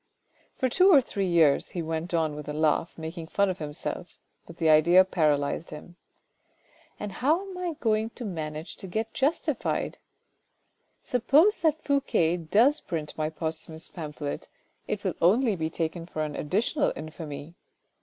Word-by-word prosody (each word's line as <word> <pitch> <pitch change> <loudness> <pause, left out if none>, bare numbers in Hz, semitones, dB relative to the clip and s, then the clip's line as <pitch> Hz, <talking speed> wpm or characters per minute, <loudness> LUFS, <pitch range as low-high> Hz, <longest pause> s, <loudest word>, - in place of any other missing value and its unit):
" - - -37
For 260 - +1
two 370 +10 +5
or 295 - +9
three 200 -6 -2
years," 165 -5 +4
he 175 - -4
went 160 +2 -3
on 160 -3 +1
with 150 0 -7
a - - -3
laugh, 155 +2 +1
making 160 +1 -6
fun 200 +3 +2
of 180 - -7
himself; 155 +3 -5 0.3
but 170 - -12
the 165 - +1
idea 170 +4 +6
paralysed 150 -4 0
him. 155 +3 -10 0.5
" - - -34
And 210 -1 -4
how 310 - +1
am 380 - -8
I 360 -3 -3
going 220 -1 +1
to 245 - -6
manage 155 -3 -5
to 190 - -8
get 220 +5 -3
justified? 280 +5 -1 1.0
Suppose 295 - +3
that 315 -1 +1
Fouque 175 - +1
does 255 - +4
print 155 -3 -4
my 155 0 -1
posthumous 160 0 -5
pamphlet, 150 -3 -6 0.4
it - - -3
will - - 0
only 215 +5 +4
be 160 -2 -2
taken 165 +1 -3
for 155 -3 -3
an 150 -1 -4
additional 220 - 0
infamy. 155 0 -7
170 Hz, 165 wpm, -27 LUFS, 155-225 Hz, 1.0 s, or